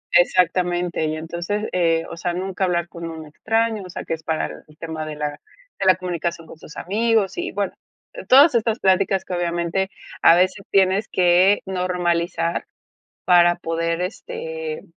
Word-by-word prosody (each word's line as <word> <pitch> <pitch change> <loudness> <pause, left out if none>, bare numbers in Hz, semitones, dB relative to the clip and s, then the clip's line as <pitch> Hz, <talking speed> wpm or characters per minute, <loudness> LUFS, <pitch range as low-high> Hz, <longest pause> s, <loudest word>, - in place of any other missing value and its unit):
Exactamente, 175 -1 +2
y 155 0 -2
entonces, 170 +6 -4
eh, 165 -2 +1
o - - -8
sea, 175 0 -2
nunca 190 +1 -2
hablar 175 -2 0
con 170 -1 -7
un 160 -1 -8
extraño. 225 +7 -1
O 185 - -10
sea, 175 - -6
que - - -3
es 160 - -5
para 160 -1 -1 0.2
el 150 0 -20
tema 160 -1 -5
de 155 -1 -6
la 150 0 -4 0.4
de 195 - -1
la 185 - +7
comunicación 170 -2 -4
con 160 - -13
sus 155 - -13
amigos. 220 +1 +1
Y, 355 +1 -3
bueno, 200 -1 -2 0.6
todas 280 +4 +8
estas 230 0 +1
pláticas 190 0 +2
que 185 - -6
obviamente 175 +2 -1 0.3
a 165 - +7
veces 185 +2 +1
tienes 195 +1 +2
que 180 +3 +4
normalizar 175 -2 -1 0.6
para 175 -1 +5
poder, 165 0 -2
este, 475 - -5
180 Hz, 165 wpm, -22 LUFS, 170-195 Hz, 0.6 s, todas